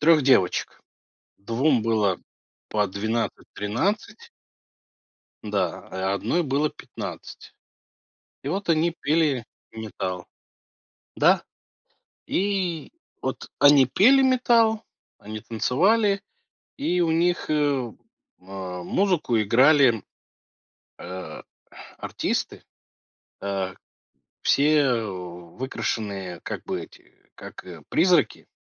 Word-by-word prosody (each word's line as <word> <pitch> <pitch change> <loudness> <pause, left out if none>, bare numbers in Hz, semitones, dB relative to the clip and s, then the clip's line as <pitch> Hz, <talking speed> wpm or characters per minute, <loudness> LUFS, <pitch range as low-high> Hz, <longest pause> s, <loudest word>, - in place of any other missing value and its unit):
3 155 0 +5
девочек: 130 -9 +2 0.6
2 120 +5 +1
было 105 -5 +1 0.5
по 105 -2 +1
12, 110 +4 -2
13 200 - -2 1.1
Да, - - -2
а - - -6
и 95 +1 0
1 115 - 0
было 145 +2 +1
15, - - -9 0.9
и 135 - -4
вот 195 +5 -3
они 165 +1 +2
пели 145 -5 +1 0.3
металл. 95 -5 -5 0.9
Да! - - +4 0.8
И 185 -5 -1 0.3
вот - - -4
они 145 -2 +7
пели 255 - +5
металл, 235 -4 +3 0.4
они 110 +1 -7
танцевали, 195 - +2 0.6
и 180 -11 +1
у 165 - +1
них, 175 +1 +1
э, 145 -6 +1 0.5
музыку 95 - -1
играли, 125 +2 +5 1.0
э, 90 +1 -7 0.6
артисты, - - -3 0.8
э, 95 -1 -2 0.7
все, 150 +2 +4
э, 125 -5 +2
выкрашенные 95 +1 -5
как - - -6
бы - - -3
эти, - - -15 0.2
как, - - -10
э, 85 -4 -10
призраки, 175 -3 +2
130 Hz, 90 wpm, -25 LUFS, 100-170 Hz, 1.1 s, они